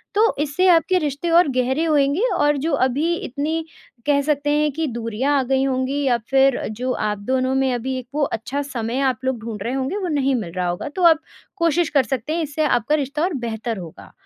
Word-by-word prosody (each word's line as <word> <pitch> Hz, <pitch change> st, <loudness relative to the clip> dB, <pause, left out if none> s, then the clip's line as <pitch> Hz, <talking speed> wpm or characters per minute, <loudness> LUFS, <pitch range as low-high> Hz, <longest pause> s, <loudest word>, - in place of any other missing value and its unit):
तो 440 Hz, +2 st, +3 dB
इससे 300 Hz, +5 st, +1 dB
आपके 355 Hz, +1 st, +4 dB
रिश्ते 295 Hz, +1 st, -2 dB
और 340 Hz, +1 st, +5 dB
गहरे 260 Hz, +5 st, +1 dB
होएँगे 290 Hz, +1 st, +2 dB
और 295 Hz, 0 st, +2 dB
जो 305 Hz, +3 st, -1 dB
अभी 280 Hz, +5 st, +1 dB
इतनी 315 Hz, +2 st, -3 dB, 0.4 s
कह 285 Hz, -1 st, +3 dB
सकते 290 Hz, 0 st, 0 dB
हैं 300 Hz, 0 st, +2 dB
कि 320 Hz, +4 st, -2 dB
दूरियाँ 235 Hz, +3 st, -1 dB
आ -, -, +2 dB
गई 265 Hz, +1 st, +1 dB
होंगी 265 Hz, +1 st, -1 dB
या 250 Hz, -3 st, +3 dB
फिर 270 Hz, -1 st, +4 dB, 0.2 s
जो 255 Hz, +2 st, -2 dB
आप 210 Hz, -2 st, -1 dB
दोनों 255 Hz, +4 st, 0 dB
में 265 Hz, -1 st, +2 dB
अभी 255 Hz, +2 st, -2 dB
एक 250 Hz, -, -11 dB
वो 300 Hz, -, 0 dB
अच्छा 270 Hz, +2 st, -2 dB
समय 245 Hz, -3 st, -3 dB
आप 260 Hz, -3 st, +1 dB
लोग 260 Hz, -2 st, 0 dB
ढूँढ 220 Hz, -3 st, -6 dB
रहे 240 Hz, -, -2 dB
होंगे 270 Hz, +8 st, -2 dB
वो 385 Hz, -3 st, -2 dB
नहीं 275 Hz, -4 st, +1 dB
मिल 210 Hz, -8 st, -4 dB
रहा 180 Hz, -1 st, -1 dB
होगा 175 Hz, +8 st, -3 dB
तो 370 Hz, -, -1 dB
आप 320 Hz, -2 st, +5 dB, 0.4 s
कोशिश 335 Hz, -1 st, +2 dB
कर 280 Hz, -3 st, +3 dB
सकते 265 Hz, +3 st, -3 dB
हैं 335 Hz, -, 0 dB
इससे 305 Hz, +1 st, -2 dB
आपका 245 Hz, +1 st, +2 dB
रिश्ता 290 Hz, +1 st, -2 dB
और 360 Hz, +1 st, 0 dB
बेहतर 230 Hz, -3 st, -3 dB
होगा। 170 Hz, -4 st, -10 dB
275 Hz, 220 wpm, -21 LUFS, 250-300 Hz, 0.4 s, और